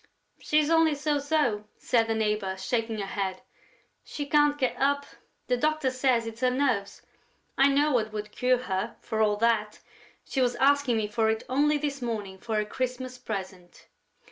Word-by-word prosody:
"She's 305 +1 +1
only 325 -2 +4
so 290 0 0
so," 285 -8 0
said 230 -2 +1
the 225 - 0
neighbor, 210 -3 -1
shaking 225 +2 -2
her 200 - -3
head. 190 -1 -3 0.6
"She 290 - -5
can't 295 0 +3
get 260 -3 0
up.... 280 +1 +1 0.4
The 250 - +1
doctor 305 -1 +1
says 255 -3 +1
it's 225 +1 -8
her 255 - +4
nerves.... 250 -7 -1 0.5
I 275 - +5
know 285 +2 +3
what 220 -4 +1
would 210 0 -5
cure 250 +1 +1
her, 195 +1 -3
for 220 0 -2
all 210 -1 +3
that. 215 -1 +1 0.5
She 270 - -1
was 245 -1 +2
asking 275 -2 +3
me 215 -1 0
for 220 +1 +1
it 220 0 -1
only 295 +4 +2
this 285 -2 -3
morning, 210 -5 -4
for 225 +1 -4
her 210 0 +1
Christmas 255 +2 -4
present...." 190 -6 -7
245 Hz, 175 wpm, -27 LUFS, 215-280 Hz, 0.6 s, I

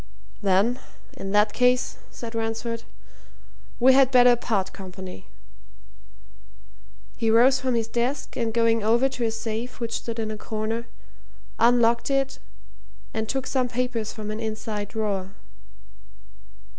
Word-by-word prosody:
"Then, 205 +5 +2 0.4
in 195 - -6
that 210 +1 +4
case," 250 0 +2
said 230 -1 -8
Ransford, 225 +1 -2 1.0
"we 260 +2 +7
had 265 -1 +6
better 245 -2 +6
part 215 -5 -1
company." 185 - -9 1.9
He 225 -2 0
rose 250 +4 +5
from 255 -2 0
his 225 -1 0
desk, 240 +4 -2
and 230 -2 -1
going 230 0 +2
over 235 +5 +3
to 250 -3 -2
a - - +2
safe 225 +2 -4
which 230 -1 -3
stood 230 -1 -6
in 220 -1 -2
a 215 - -5
corner, 220 +2 -3 0.7
unlocked 235 0 +4
it 275 -1 0 0.7
and 220 0 -2
took 265 -1 -1
some 255 -2 0
papers 245 -2 -2
from 215 -2 -6
an 215 - -4
inside 215 -2 -4
drawer. 200 -3 -3
230 Hz, 130 wpm, -25 LUFS, 215-245 Hz, 1.9 s, we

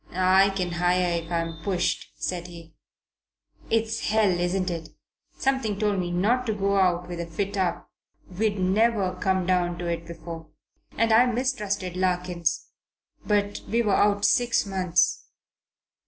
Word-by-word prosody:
"I 185 +2 +4
can 185 -2 -2
hire 175 0 +1
if 165 - -13
I'm 165 -1 -2
pushed," 180 +1 -1
said 180 -1 -3
he. 165 -2 -12 1.0
"It's 225 0 0
hell, 215 -2 +3
isn't 180 +1 0
it? 165 -2 -5 0.5
Something 265 -7 0
told 205 -2 0
me 175 -1 -2
not 220 +9 +1
to 220 - +1
go 200 0 +1
out 180 -2 +2
with 175 -1 -6
a 170 - -4
fit 195 +5 -3
up. 185 -3 -1 0.4
We'd 205 +3 -1
never 195 0 +2
come 185 0 0
down 175 -1 +1
to 175 - -5
it 170 -1 -3
before. 165 -1 -8 0.5
And 230 0 +3
I 240 +3 +6
mistrusted 210 -7 -2
Larkins 180 -3 -1 0.6
but 205 -1 0
we 235 +1 +2
were 205 -3 +1
out 205 0 +3
six 240 -3 +2
months. 185 -3 +1
185 Hz, 150 wpm, -25 LUFS, 175-205 Hz, 1.0 s, I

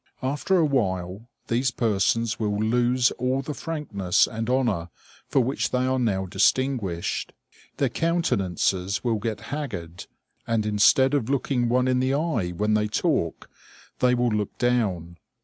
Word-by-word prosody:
After 145 +8 +1
a 165 - +4
while 100 -5 -1 0.2
these 125 +3 +1
persons 115 0 0
will 105 -2 -1
lose 120 +3 +2
all 130 +2 0
the 150 - -4
frankness 130 - 0
and 115 +1 -4
honor 120 -10 0 0.4
for 135 - +2
which 130 +3 -1
they 125 0 0
are 130 0 +1
now 100 -6 0
distinguished. 100 -1 0 0.4
Their - - +2
countenances 100 - 0
will 115 -3 0
get 110 0 -3
haggard, 90 - -5 0.4
and 115 -2 0
instead 105 +6 +4
of 135 -5 0
looking 130 -3 0
one 125 +1 +2
in 130 0 +2
the 130 +1 +1
eye 140 - -1
when 105 +5 -1
they 105 0 +2
talk, 105 - -1 0.5
they 125 0 +3
will 120 0 +1
look 105 -2 -2
down. 95 -9 0
115 Hz, 150 wpm, -25 LUFS, 100-130 Hz, 0.5 s, a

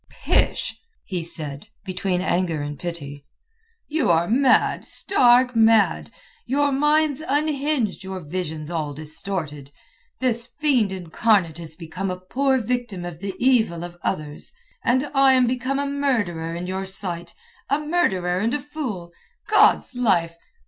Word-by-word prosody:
"Pish!" - - 0 0.3
he 185 -5 -3
said, 155 -1 -5 0.2
between 185 -1 -1
anger 175 -4 0
and 145 -1 -6
pity, 145 -5 -6 0.6
"you 300 - 0
are 170 0 +3
mad, 260 +4 +3
stark 250 -7 +3
mad! 225 -2 +4 0.4
Your 285 +3 +2
mind's 295 +1 +2
unhinged, 285 -7 0
your 190 0 -5
vision's 160 -1 -5
all 155 -4 -3
distorted. 155 -2 -4 0.5
This 240 -2 0
fiend 260 -10 +2
incarnate 185 -1 +1
is 160 -2 -6
become 180 +4 -5
a 180 0 -4
poor 265 +8 +1
victim 240 -6 -3
of 175 -2 -7
the 195 0 -5
evil 225 -10 +2
of 175 0 -8
others; 150 -5 -3 0.3
and 260 +4 +2
I 270 -1 +5
am 255 -1 +4
become 255 +2 -1
a 285 - 0
murderer 225 -13 -1
in 175 +1 -4
your 190 +1 -3
sight—a 195 - -3
murderer 190 - +1
and 230 +6 0
a - - -1
fool. 255 - -5 0.4
God's - - +4
Life! 185 -9 +1
195 Hz, 135 wpm, -23 LUFS, 170-260 Hz, 0.6 s, I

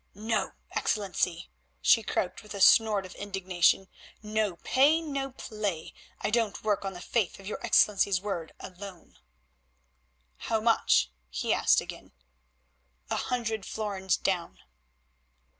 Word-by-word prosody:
"No, 220 +2 -1 0.2
Excellency," 185 -4 -1 0.3
she 225 - +5
croaked 185 -3 -2
with 210 -2 -10
a - - -5
snort 205 0 +5
of 185 - -10
indignation, 190 -2 +1 0.4
"no 210 -3 -1
pay, 280 - +3
no 280 -4 -3
play; 210 -9 -4 0.3
I - - -1
don't 225 -2 0
work 205 -2 0
on 195 0 -4
the 180 - -9
faith 215 -3 -1
of 195 - -13
your 210 - -6
Excellency's 200 -4 +3
word 180 -5 -4
alone." 185 -1 -11 1.2
"How 225 - -1
much?" 220 - +3 0.2
he 60 - -1
asked - - +4
again. - - -10 1.0
"A - - +1
hundred 225 -4 -2
florins 195 -3 -2
down." 180 -3 -2
205 Hz, 125 wpm, -28 LUFS, 190-220 Hz, 1.2 s, she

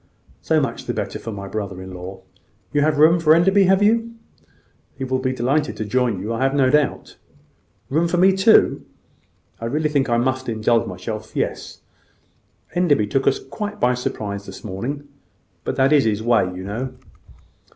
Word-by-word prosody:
"So - - +2
much - - -3
the - - -2
better - - -4
for 115 - -6
my 100 -2 -7
brother 100 -2 -5
in 95 0 -9
law. 95 +1 -8 0.5
You 145 - +2
have 150 0 +2
room 160 +3 +5
for 160 -1 +5
Enderby, 195 +4 +4
have 190 +2 +3
you? 230 +2 +2 0.8
He 135 - -4
will 130 0 -1
be 130 0 -1
delighted 135 +5 0
to 110 - -3
join 120 -2 0
you, 105 +5 -3
I 115 - -3
have 135 +1 +1
no 130 -2 +3
doubt. 150 -1 0 0.7
Room 160 +5 +1
for 175 - -1
me 190 +2 +6
too? 195 +4 +4 0.8
I 115 - -5
really 150 +6 0
think 140 -3 0
I 120 - +2
must 130 +1 -1
indulge 115 +1 +1
myself. 105 +4 -7
Yes; - - -3 0.9
Enderby 160 -11 +2
took 135 +5 -1
us 135 - +3
quite 210 +8 -6
by 125 +1 +3
surprise 100 -5 -4
this - - -10
morning: 125 +9 -5 0.6
but - - -3
that 135 +2 +3
is 145 -5 +4
his 110 -1 0
way, 115 -4 +3
you 90 +1 -7
know." 120 +7 -4
130 Hz, 185 wpm, -21 LUFS, 110-155 Hz, 0.9 s, me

